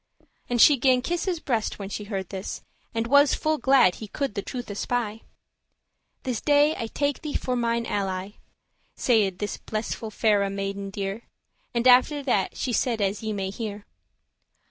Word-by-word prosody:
And 245 Hz, -1 st, 0 dB
she 290 Hz, +4 st, +8 dB
gan 255 Hz, 0 st, +3 dB
kiss 345 Hz, +4 st, -1 dB
his 360 Hz, -4 st, -1 dB
breast 235 Hz, -8 st, -1 dB
when 195 Hz, -1 st, -6 dB
she 205 Hz, +1 st, -5 dB
heard 195 Hz, -3 st, -4 dB
this, 190 Hz, -1 st, -6 dB, 0.3 s
And 225 Hz, 0 st, -1 dB
was 285 Hz, +3 st, +5 dB
full 310 Hz, -1 st, 0 dB
glad 260 Hz, -8 st, +4 dB
he 215 Hz, -, -5 dB
could 275 Hz, +2 st, -3 dB
the 200 Hz, -, -2 dB
truth 245 Hz, 0 st, -6 dB
espy: 225 Hz, +1 st, -2 dB, 1.0 s
"This 250 Hz, -4 st, -2 dB
day 295 Hz, +1 st, +4 dB
I 230 Hz, -, -4 dB
take 285 Hz, +4 st, -1 dB
thee 305 Hz, -2 st, -5 dB
for 255 Hz, -, -1 dB
mine 235 Hz, -1 st, 0 dB
ally."* 195 Hz, -2 st, -2 dB
*chosen -, -, -19 dB
friend -, -, -30 dB, 0.5 s
Saide 210 Hz, -7 st, +2 dB
this 205 Hz, +1 st, -3 dB
blissful 220 Hz, +1 st, -4 dB
faire 205 Hz, -2 st, +2 dB
maiden 195 Hz, 0 st, -4 dB
dear; 195 Hz, +3 st, -4 dB, 0.5 s
And 235 Hz, +2 st, +2 dB
after 255 Hz, +4 st, +5 dB
that 225 Hz, -8 st, 0 dB
she 250 Hz, -, -2 dB
said 235 Hz, -1 st, +1 dB
as 200 Hz, 0 st, 0 dB
ye 220 Hz, -1 st, -3 dB
may 195 Hz, -2 st, -3 dB
hear. 210 Hz, -1 st, -6 dB
225 Hz, 180 wpm, -25 LUFS, 200-255 Hz, 1.0 s, she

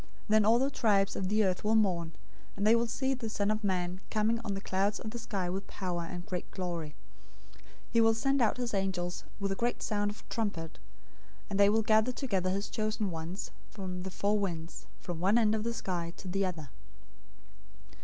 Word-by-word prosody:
Then 215 Hz, 0 st, +5 dB
all 225 Hz, +2 st, +6 dB
the 270 Hz, +3 st, +1 dB
tribes 205 Hz, -6 st, +2 dB
of 190 Hz, -, -1 dB
the 215 Hz, 0 st, +3 dB
earth 185 Hz, -1 st, 0 dB
will 215 Hz, +1 st, +3 dB
mourn, 175 Hz, -6 st, +2 dB, 0.4 s
and 200 Hz, -, 0 dB
they 220 Hz, +2 st, +7 dB
will 235 Hz, 0 st, +2 dB
see 265 Hz, +3 st, 0 dB
the 245 Hz, -4 st, -4 dB
Son 205 Hz, -1 st, +1 dB
of 215 Hz, +1 st, -1 dB
Man 185 Hz, -1 st, -1 dB
coming 220 Hz, +1 st, +2 dB
on 200 Hz, -3 st, -2 dB
the -, -, -3 dB
clouds 195 Hz, +1 st, 0 dB
of 220 Hz, -, -5 dB
the 235 Hz, -, -5 dB
sky 195 Hz, -5 st, -2 dB
with 190 Hz, +2 st, -3 dB
power 180 Hz, -3 st, -3 dB
and 175 Hz, -2 st, -6 dB
great 180 Hz, -1 st, -4 dB
glory. 170 Hz, -5 st, -4 dB, 0.6 s
024:031 -, -, -23 dB, 0.3 s
He 230 Hz, -, +5 dB
will 225 Hz, 0 st, +6 dB
send 270 Hz, +3 st, +2 dB
out 225 Hz, 0 st, +3 dB
his 245 Hz, -2 st, -2 dB
angels 185 Hz, -3 st, -1 dB
with 200 Hz, -1 st, -1 dB
a -, -, 0 dB
great 240 Hz, +4 st, -1 dB
sound 205 Hz, -1 st, +1 dB
of 205 Hz, -, -8 dB
a -, -, -6 dB
trumpet, 185 Hz, -, -2 dB, 0.7 s
and 200 Hz, -, 0 dB
they 200 Hz, 0 st, +7 dB
will 220 Hz, +1 st, +3 dB
gather 220 Hz, +3 st, +4 dB
together 200 Hz, -9 st, -1 dB
his 200 Hz, +2 st, -1 dB
chosen 215 Hz, -2 st, -1 dB
ones 165 Hz, +3 st, -5 dB, 0.2 s
from 185 Hz, -3 st, -5 dB
the 190 Hz, -, -4 dB
four 205 Hz, +3 st, +1 dB
winds, 165 Hz, -, -4 dB
from 170 Hz, -, -5 dB
one 195 Hz, +6 st, +4 dB
end 220 Hz, -2 st, +4 dB
of 215 Hz, -1 st, 0 dB
the 235 Hz, -, 0 dB
sky 175 Hz, -7 st, -3 dB
to -, -, -9 dB
the 195 Hz, +1 st, +1 dB
other. 160 Hz, -6 st, -6 dB
200 Hz, 215 wpm, -31 LUFS, 180-220 Hz, 0.7 s, they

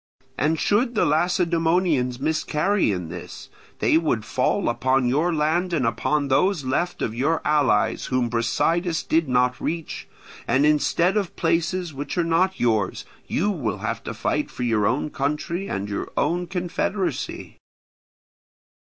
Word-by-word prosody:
And 155 Hz, +2 st, 0 dB
should 235 Hz, +4 st, +1 dB
the -, -, +3 dB
Lacedaemonians 165 Hz, -5 st, +1 dB
miscarry 155 Hz, -, +1 dB
in 90 Hz, -4 st, -4 dB
this, 85 Hz, +1 st, -9 dB, 0.3 s
they 160 Hz, -, +3 dB
would 120 Hz, -10 st, -1 dB
fall -, -, 0 dB
upon 130 Hz, 0 st, +1 dB
your 150 Hz, +8 st, +2 dB
land, 165 Hz, +3 st, 0 dB
and 145 Hz, -7 st, +1 dB
upon 140 Hz, +6 st, 0 dB
those 160 Hz, +3 st, +2 dB
left 175 Hz, +7 st, -1 dB
of 110 Hz, -, -2 dB
your 145 Hz, +7 st, +1 dB
allies 145 Hz, -8 st, +2 dB
whom 130 Hz, -2 st, +1 dB
Brasidas 165 Hz, +9 st, 0 dB
did 160 Hz, -3 st, +1 dB
not 125 Hz, 0 st, +1 dB
reach; 165 Hz, -1 st, -4 dB, 0.4 s
and 140 Hz, +2 st, +3 dB
instead 170 Hz, +5 st, +2 dB
of 200 Hz, -4 st, -2 dB
places 170 Hz, +1 st, 0 dB
which 140 Hz, +5 st, -5 dB
are 175 Hz, -, +3 dB
not 180 Hz, +3 st, +1 dB
yours, 110 Hz, -5 st, 0 dB, 0.2 s
you 205 Hz, +5 st, 0 dB
will 115 Hz, -, -2 dB
have -, -, -4 dB
to -, -, -5 dB
fight -, -, -1 dB
for 125 Hz, -, -6 dB
your 110 Hz, -4 st, +2 dB
own 145 Hz, +6 st, -1 dB
country 150 Hz, +7 st, -2 dB
and 100 Hz, +2 st, -3 dB
your 100 Hz, -, -4 dB
own 175 Hz, +4 st, 0 dB
confederacy. 180 Hz, +2 st, -3 dB
155 Hz, 145 wpm, -23 LUFS, 125-175 Hz, 0.4 s, the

